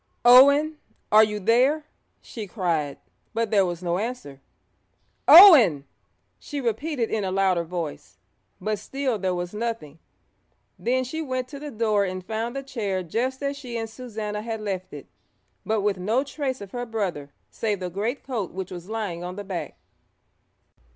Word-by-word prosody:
'Owen, 280 +5 +7 0.3
are 215 +1 +8
you 210 -1 -1
there?' 255 +9 +2 0.4
she 220 -3 -8
cried, 165 -8 -2 0.4
but 230 -2 -1
there 200 -3 +4
was 175 0 -5
no 175 +1 0
answer. 210 - -6 0.9
'Owen!' 255 - +9 0.5
she 290 - -6
repeated 245 +1 -2
in 215 -2 -1
a 190 - -1
louder 190 -2 +2
voice, 170 -3 -6 0.4
but 215 -1 -2
still 260 0 -2
there 185 -1 -1
was 175 +1 -4
nothing. 210 -9 -4 0.8
Then 255 +2 0
she 315 +6 -5
went 255 -4 -3
to 280 - -8
the 295 +1 -7
door 215 -4 +1
and 185 -1 -4
found 225 +4 -3
the 275 - -4
chair 205 -8 -3
just 255 - -2
as 280 0 -1
she 250 -4 -6
and 225 0 -3
Susannah 220 -3 -6
had 225 0 -4
left 195 -3 -4
it, - - -9 0.6
but 220 -1 +1
with 200 -2 0
no 220 +8 +1
trace 275 -3 -4
of 200 -1 -9
her 245 0 -5
brother 180 -11 -3 0.2
save 210 -3 -2
the 180 -1 -5
greatcoat 225 +1 -3
which 190 0 -6
was 175 +1 -8
lying 205 -6 -4
on 180 +1 -6
the 205 - -6
back. 190 -3 -5
215 Hz, 165 wpm, -25 LUFS, 185-255 Hz, 0.9 s, Owen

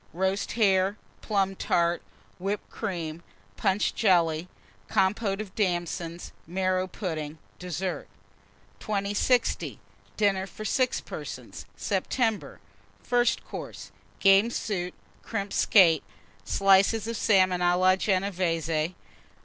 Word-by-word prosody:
Roast 190 +3 -1
Hare. 195 -2 +3 0.2
Plum 195 -2 0
Tart. 170 -1 +1 0.4
Whipped 200 +3 -3
Cream. 170 -6 -4 0.3
Punch 195 0 +1
Jelly. 170 -5 +2 0.4
Compôte 195 0 +1
of 215 -3 -6
Damsons. 175 -3 -2 0.2
Marrow 185 +1 0
Pudding. 160 -5 -5 0.2
DESSERT. 180 +1 -4 0.7
2060. 205 +4 0 0.4
DINNER 195 -2 +2
FOR 215 - -9
6 255 +3 +1
PERSONS - - -8
(September). 225 -5 -1 0.4
FIRST 245 -1 +1
COURSE. - - -8 0.3
Game 195 +3 +5
Soup. 185 -6 -3 0.3
Crimped 200 -3 -4
Skate. 170 -7 +5 0.4
Slices 195 - +3
of 230 - -3
Salmon 185 -4 +3
a 175 0 +3
la 185 +1 +5
Genévése. 180 -4 0
190 Hz, 100 wpm, -27 LUFS, 175-205 Hz, 0.7 s, Game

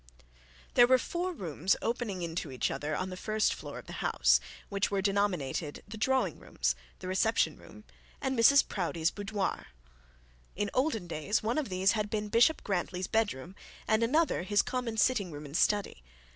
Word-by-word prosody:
There 240 - +7
were 260 +1 +6
four 350 +7 -3
rooms 185 - 0
opening 225 -6 -2
into 165 -3 -4
each 130 - -1
other 150 +1 -3
on 185 +3 -3
the - - -5
first 215 +3 0
floor - - -8
of - - -9
the - - -9
house, - - +4 0.3
which 200 -1 0
were 200 - 0
denominated 190 -7 -1
the - - -8
drawing 260 +4 +1
rooms, - - -1 0.2
the 185 - -8
reception 205 +5 +2
room, - - -14 0.4
and 265 -1 -1
Mrs 265 +4 +6
Proudie's 170 -3 -1
boudoir. 205 -1 -3 0.9
In 205 +1 -2
olden 255 - 0
days 175 +6 -1
one 235 +7 +1
of 285 - -3
these 185 +2 +3
had 210 -2 -1
been 210 -1 -2
Bishop 240 +9 +4
Grantly's 180 -1 -2
bed 220 0 +1
room, 130 +8 -9 0.3
and 220 +1 +3
another 300 - +2
his 205 +3 +2
common, 245 -3 -3
sitting 210 -6 +2
room 150 0 -8
and 145 +1 -8
study. 205 - +1
205 Hz, 175 wpm, -30 LUFS, 180-230 Hz, 0.9 s, There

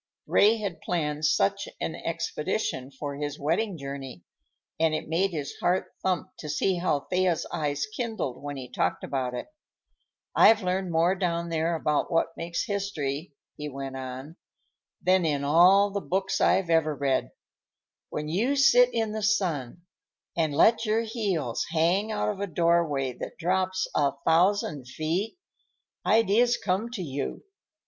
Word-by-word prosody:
Ray 215 +3 +4
had 200 -6 -5
planned 150 -3 -1
such 125 -10 +2
an - - -2
expedition 130 0 -3
for 140 +1 -6
his 145 0 -4
wedding 175 +6 0
journey, 135 - -7 0.6
and 160 -1 +3
it - - -4
made 175 +5 +1
his 150 -6 -4
heart 180 +2 0
thump 185 0 -1
to 150 - -7
see 180 +5 +1
how 170 -5 0
Thea's 180 0 0
eyes 145 -2 -1
kindled 220 - -4
when 145 0 -5
he 130 -2 -7
talked - - -1
about 130 -2 -2
it. - - -4 0.9
"I've 220 -2 +6
learned 185 0 -1
more 165 +3 +3
down 170 -3 -1
there 165 +1 0
about 150 -2 0
what 165 0 +1
makes 170 0 -3
history," 160 -7 -3 0.2
he 150 0 -5
went 135 -1 -6
on, 130 +5 -7 0.7
"than 185 0 +4
in 145 -3 0
all 180 +7 +5
the 200 0 -2
books 190 +1 -1
I've 180 -3 +3
ever 155 -2 +3
read. 140 -2 0 0.8
When 150 0 -4
you 220 - +1
sit 250 -3 +6
in 225 -2 -1
the 215 0 -3
sun 175 - 0 0.5
and 160 -3 +1
let 220 +11 +4
your 220 0 +1
heels 200 - -2
hang 175 +7 +1
out 210 - 0
of 205 -2 -3
a 200 - -2
doorway 165 -6 +1
that - - -6
drops 185 +2 0
a 140 -2 +2
thousand 165 -5 +2
feet, 165 - -2 0.7
ideas 225 +3 +4
come 200 +4 -1
to 230 -6 -5
you. 140 -3 -4
170 Hz, 155 wpm, -27 LUFS, 145-195 Hz, 0.9 s, I've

